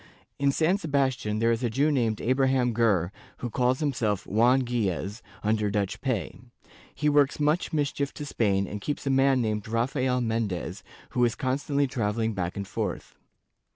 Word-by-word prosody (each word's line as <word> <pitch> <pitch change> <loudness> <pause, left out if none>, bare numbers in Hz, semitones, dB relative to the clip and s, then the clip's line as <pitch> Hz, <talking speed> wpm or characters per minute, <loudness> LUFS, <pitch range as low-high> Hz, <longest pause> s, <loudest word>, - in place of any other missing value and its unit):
In 140 0 +3
San 165 +7 +2
Sebastian, 135 - 0
there 115 +1 +2
is 115 +2 -1
a 120 - +1
Jew 140 +7 +2
named 115 -6 0
Abraham 130 -1 +2
Ger, 100 -7 +2 0.3
who 120 - -5
calls 125 +4 +1
himself 115 -9 0
Juan 125 +5 +3
Gilles, 105 -4 -2 0.2
under 105 -1 +1
Dutch 100 -1 -2
pay; 110 - -2 0.6
he 150 - 0
works 145 -1 +3
much 150 +4 +1
mischief 145 -2 -1
to 150 - -5
Spain 100 -7 +1
and 105 +1 -6
keeps 145 +7 -3
a 135 - +1
man 135 -1 +3
named 105 -1 -2
Rafael 125 +3 0
Mendez, 110 -6 -2 0.3
who 125 - +1
is 120 -2 +2
constantly 140 +2 0
travelling 115 -3 -1
back 90 -2 -3
and 100 -1 -4
forth. - - -4
120 Hz, 165 wpm, -27 LUFS, 105-135 Hz, 0.6 s, In